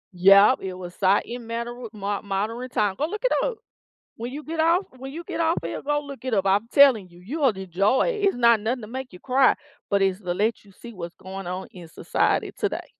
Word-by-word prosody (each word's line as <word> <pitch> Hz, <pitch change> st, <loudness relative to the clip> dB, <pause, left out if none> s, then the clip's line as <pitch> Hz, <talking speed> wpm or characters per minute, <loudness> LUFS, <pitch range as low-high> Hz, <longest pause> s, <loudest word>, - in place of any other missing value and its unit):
Yep, 195 Hz, +6 st, +6 dB
it 190 Hz, -1 st, -4 dB
was 180 Hz, -1 st, -8 dB
si 190 Hz, -, 0 dB, 0.3 s
it -, -, -6 dB
matter 235 Hz, +1 st, -5 dB
with 240 Hz, -3 st, -9 dB
mod 205 Hz, 0 st, -3 dB
modern 215 Hz, +6 st, -3 dB
time, 205 Hz, -4 st, +1 dB
go 300 Hz, -, 0 dB
look 425 Hz, +6 st, -6 dB
it -, -, +3 dB
up. 475 Hz, -3 st, -3 dB, 0.6 s
When 235 Hz, +2 st, -5 dB
you 300 Hz, +2 st, -6 dB
get 320 Hz, 0 st, -3 dB
off 335 Hz, +4 st, +4 dB, 0.2 s
when 265 Hz, +1 st, -7 dB
you 335 Hz, +4 st, -7 dB
get -, -, -5 dB
off 330 Hz, +1 st, +2 dB
of -, -, -4 dB
here -, -, -5 dB
go 295 Hz, +1 st, 0 dB
look 275 Hz, -2 st, -10 dB
it 255 Hz, -4 st, 0 dB
up, 195 Hz, -1 st, +1 dB
I'm 200 Hz, +4 st, +2 dB
telling 255 Hz, -10 st, +5 dB
you, 175 Hz, 0 st, -17 dB
you 300 Hz, +9 st, -5 dB
will 275 Hz, -, +5 dB
enjoy 195 Hz, -, +1 dB
it, 425 Hz, -4 st, -2 dB
it's 390 Hz, -, +2 dB
not 235 Hz, -2 st, +5 dB
nothing 235 Hz, +2 st, -2 dB
to -, -, -7 dB
make 260 Hz, -2 st, -6 dB
you 180 Hz, -, -12 dB
cry, 260 Hz, 0 st, +4 dB, 0.3 s
but 200 Hz, -1 st, +2 dB
it's 190 Hz, +1 st, +1 dB
the 175 Hz, -2 st, -3 dB
let 215 Hz, +2 st, -1 dB
you -, -, -17 dB
see 235 Hz, +4 st, -11 dB
what's 170 Hz, -3 st, -7 dB
going 190 Hz, 0 st, -8 dB
on 185 Hz, +1 st, -5 dB
in 175 Hz, -3 st, -11 dB
society -, -, 0 dB
today. -, -, -2 dB
230 Hz, 250 wpm, -24 LUFS, 195-270 Hz, 0.6 s, Yep